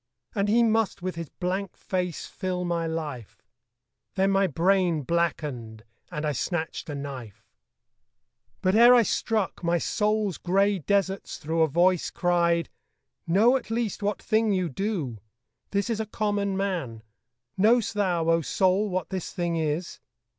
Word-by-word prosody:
And 200 0 0
he 235 +3 +4
must 225 -5 +1
with 185 0 -2
his 165 -3 -6
blank 190 +1 -3
face 180 -3 -3
fill 180 -1 -3
my 170 -1 -1
life 150 -9 -6 0.7
Then 195 0 +2
my 195 0 +3
brain 175 -1 +2
blackened; 135 -9 -2 0.3
and 150 +1 -4
I 150 - +1
snatched 160 +4 -3
a 145 - -4
knife. 135 -7 -8 1.2
But 185 - +3
ere 240 +3 +8
I 240 - +6
struck, 215 -4 -1
my 170 0 +2
soul's 210 +1 0
grey 195 +2 +2
deserts 195 +2 -1
through 160 +2 -1
A 160 - +5
voice 175 +4 +2
cried, 170 -1 +1 0.6
'Know 215 +9 +5
at 260 - -3
least 225 -3 -2
what 205 0 -1
thing 220 -1 +1
you 185 -3 0
do.' 155 - -3 0.5
'This 200 +3 -1
is 220 - -1
a 220 - -2
common 205 -2 -1
man: 170 - -3 0.5
knowest 225 +3 +3
thou, 180 -5 0
O 165 0 +3
soul, 190 +6 +1
What 180 -2 -3
this 190 -3 -4
thing 175 -1 -2
is? 160 +2 -2
185 Hz, 150 wpm, -26 LUFS, 165-200 Hz, 1.2 s, ere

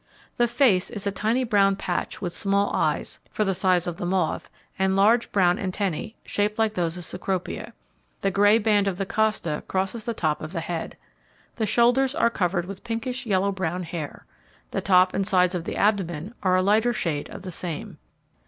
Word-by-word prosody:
The 240 - +3
face 235 -6 +3
is 210 -4 -5
a 200 - +1
tiny 225 +6 0
brown 200 -4 +3
patch 180 -2 -3
with 175 -2 -2
small 200 +2 +1
eyes, - - -1
for 215 - -1
the 195 - +1
size 185 -1 +2
of 175 -1 -4
the - - -4
moth, 180 -3 -1 0.3
and 190 0 +2
large 220 +5 +3
brown 180 -3 +3
antennae, 195 +2 -2
shaped 210 +1 -1
like 220 -1 +2
those 175 -3 -1
of 175 - -6
Cecropia. 190 -2 -3 0.5
The 195 - +1
grey 205 +3 +5
band 205 -2 +2
of 190 -2 -1
the 195 - -2
costa 210 -7 0
crosses 195 +4 -2
the 235 -2 -2
top 155 -5 0
of 155 +3 -6
the 170 - -2
head. 165 0 -5 0.6
The 220 -2 0
shoulders 245 +5 +3
are 235 -8 +3
covered 175 -4 0
with 195 +1 -8
pinkish, 245 +2 -4
yellow 200 -1 +2
brown 180 -2 -2
hair. 165 -3 -6 0.5
The - - -1
top 185 -1 +4
and 195 - 0
sides 180 -3 +3
of 175 -2 -3
the - - -4
abdomen 195 -2 0
are 185 -2 +3
a 185 - +3
lighter 220 +5 +3
shade 155 -9 -2
of - - -9
the 185 - -6
same. 170 -2 -6
195 Hz, 195 wpm, -25 LUFS, 180-215 Hz, 0.6 s, grey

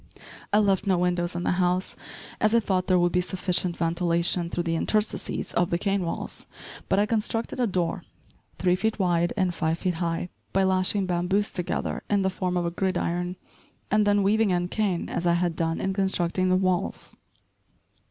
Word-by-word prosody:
I 205 - +4
left 200 -1 +2
no 190 -2 +3
windows 175 0 0
in 175 - -2
the - - +1
house, 180 +1 0 0.4
as 215 +1 +3
I - - +6
thought 190 -4 -1
there 185 - +4
would 175 0 +3
be 180 - +2
sufficient 180 0 0
ventilation 170 +1 +1
through 175 - -2
the 165 -1 -1
interstices 215 +5 -1
of 175 0 +2
the 170 - +1
cane 195 +1 0
walls, 165 - -5 0.4
but 190 - +3
I 205 - +4
constructed 225 +2 -1
a 245 - +2
door 180 -1 -1 0.5
three 180 -1 +2
feet 220 +4 -1
wide 175 -3 +1
and 185 -3 +1
five 165 -1 0
feet 180 0 -1
high, 170 +1 -1 0.2
by 195 - +3
lashing 190 +1 +2
bamboos 185 +3 0
together 180 -2 -2
in 205 -1 +2
the 190 - +1
form 180 -1 -2
of 175 - 0
a 170 - -1
gridiron, 180 -1 -1 0.6
and 210 0 +3
then 205 -1 +3
weaving 215 +2 +3
in 175 -1 0
cane 195 -5 -1
as 175 - -2
I 170 - +4
had 175 -1 0
done 165 0 -1
in 190 - -1
constructing 185 -1 0
the 185 - +4
walls. 185 -1 -1
180 Hz, 190 wpm, -26 LUFS, 175-195 Hz, 0.6 s, I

